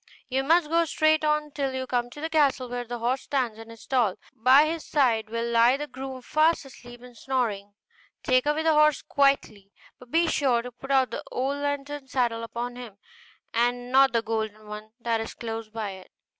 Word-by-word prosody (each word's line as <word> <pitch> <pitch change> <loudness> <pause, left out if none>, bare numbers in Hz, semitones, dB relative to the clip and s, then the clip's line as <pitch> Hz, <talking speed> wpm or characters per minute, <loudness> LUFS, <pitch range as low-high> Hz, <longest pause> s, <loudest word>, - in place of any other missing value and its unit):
You 265 +1 0
must 325 +3 +3
go 335 +2 +3
straight 310 0 +2
on 300 0 0
till 275 -2 -2
you 260 0 -3
come 245 -1 -1
to 290 - -11
the 320 - -1
castle 280 -5 +2
where 245 0 -4
the 240 +1 -5
horse 245 +3 -1
stands 250 -6 -2
in 225 0 -11
his 230 -1 -12
stall: 240 -8 +1 0.2
by 260 +6 +5
his 320 0 -3
side 230 -7 +1
will 230 +1 -2
lie 235 +2 +4
the 295 - -4
groom 265 -2 -8
fast 315 +3 +2
asleep 245 -2 -13
and 250 -1 -13
snoring: 215 -6 -2 0.5
take 255 +2 +2
away 300 +2 +1
the 320 -1 +3
horse 305 -1 +4
quietly, 275 -8 +1 0.3
but 250 - -15
be 330 +5 +3
sure 260 -7 +1
to 250 - -7
put 245 +3 -12 0.2
the - - -4
old 270 +3 -1
leathern 285 -1 -4
saddle 240 -3 0
upon 235 +2 -5
him, 235 -5 -10 0.6
and 245 +1 0
not 270 +1 +6
the 230 -1 +1
golden 220 -1 -3
one 210 +1 -8
that 230 -1 -1
is 225 - -7
close 225 -1 -6
by 215 -2 -4
it. 190 -1 -12
250 Hz, 200 wpm, -26 LUFS, 230-285 Hz, 0.6 s, not